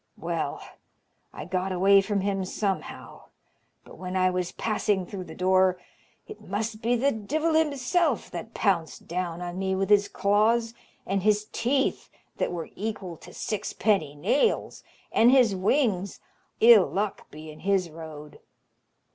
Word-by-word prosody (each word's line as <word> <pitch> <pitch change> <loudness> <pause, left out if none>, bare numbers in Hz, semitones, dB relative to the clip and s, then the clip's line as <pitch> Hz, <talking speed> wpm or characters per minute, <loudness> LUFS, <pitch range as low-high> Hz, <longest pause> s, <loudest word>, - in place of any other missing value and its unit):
Well, - - -3 0.7
I - - -8
got 185 +1 -2
away 195 +2 +5
from 200 0 -1
him 195 -1 -1
somehow, 195 +1 -4 0.6
but - - -14
when 185 0 -5
I 185 0 +3
was 180 -1 -2
passing 210 -3 -1
through 185 0 -7
the 160 - -10
door, 185 0 +3 0.5
it 425 - -11
must 220 +1 -4
be 235 +2 +2
the 270 +4 +2
divil 300 +9 -1
himself 305 - +1
that 225 +1 -7
pounced 180 -6 -1
down 175 0 -3
on 175 +1 -5
me 190 0 0
with 195 +1 -1
his 205 -1 +5
claws, 225 +3 +1 0.3
and 195 +1 -1
his 210 +1 +2
teeth, 265 +3 0 0.3
that - - -1
were 170 -2 -5
equal 200 -4 -5
to - - -14
sixpenny 200 -7 -1
nails, 240 - 0 0.3
and 230 - +5
his 250 -6 +5
wings 200 -1 0 0.4
ill 225 -4 +8
luck 205 +1 -3
be 155 +1 -10
in 150 - -14
his 190 -3 0
road! 155 -2 -10
200 Hz, 145 wpm, -26 LUFS, 185-225 Hz, 0.7 s, ill